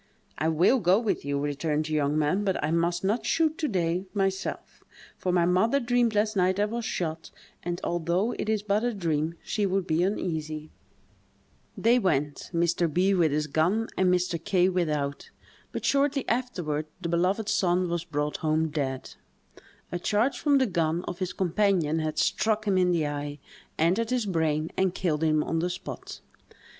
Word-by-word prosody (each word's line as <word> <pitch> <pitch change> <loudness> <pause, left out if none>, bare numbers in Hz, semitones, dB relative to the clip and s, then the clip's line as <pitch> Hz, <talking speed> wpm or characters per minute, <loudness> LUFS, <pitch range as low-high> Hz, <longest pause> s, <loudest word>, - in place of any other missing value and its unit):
"I 155 - +1
will 175 +11 +4
go 185 -1 +4
with 225 -2 -1
you," 140 0 -1
returned 150 +2 -1
the 155 - -4
young 150 0 +1
man, 155 +7 +1
"but 190 -2 0
I 150 - 0
must 170 +1 +1
not 210 +5 0
shoot, 320 -1 +1
to 310 - 0
day, 180 -2 -1
myself; 195 -1 -2 0.3
for 185 - -2
my 175 -1 +3
mother 190 +10 +3
dreamed 240 -3 +1
last 210 +1 +1
night 185 0 +2
I 205 - +3
was 230 +2 -4
shot; 165 -6 -3 0.3
and, 175 0 -3
although 175 +6 0
it - - -2
is 215 -2 0
but 210 +1 +1
a 240 -2 0
dream, 165 -3 -1
she 205 -2 0
would 190 -1 0
be 160 -1 +1
uneasy." 155 -5 -2 1.1
They 240 +2 +4
went, 150 - -1
Mr. 170 -1 +1
B—— 185 +5 +2
with 170 -5 +3
his 150 +1 0
gun, 175 +10 +1
and 185 -1 +3
Mr. 180 -2 0
K—— 185 -3 +3
without. 150 -6 -2 0.4
But - - -4
shortly 280 -1 +1
afterward 175 -11 -1
the 180 - -4
beloved 185 +5 +1
son 185 -4 +2
was 170 -1 -2
brought 150 -3 -2
home 155 0 +1
dead: 135 -3 -3 0.8
a 175 - -2
charge 215 +9 +1
from 290 -2 +3
the 265 - +3
gun 170 -4 0
of 175 - -5
his 185 -1 -2
companion 180 -4 +1
had 155 -1 -2
struck 220 -1 +1
him 200 -2 +2
in 180 -1 +3
the 170 -3 +1
eye, 145 0 -4 0.4
entered 190 +8 +2
his 250 -3 0
brain, 160 -4 0
and 190 -1 +1
killed 160 -4 0
him 155 -1 +3
on 165 - -1
the 175 +2 0
spot. 180 +1 -7
175 Hz, 180 wpm, -27 LUFS, 155-205 Hz, 1.1 s, will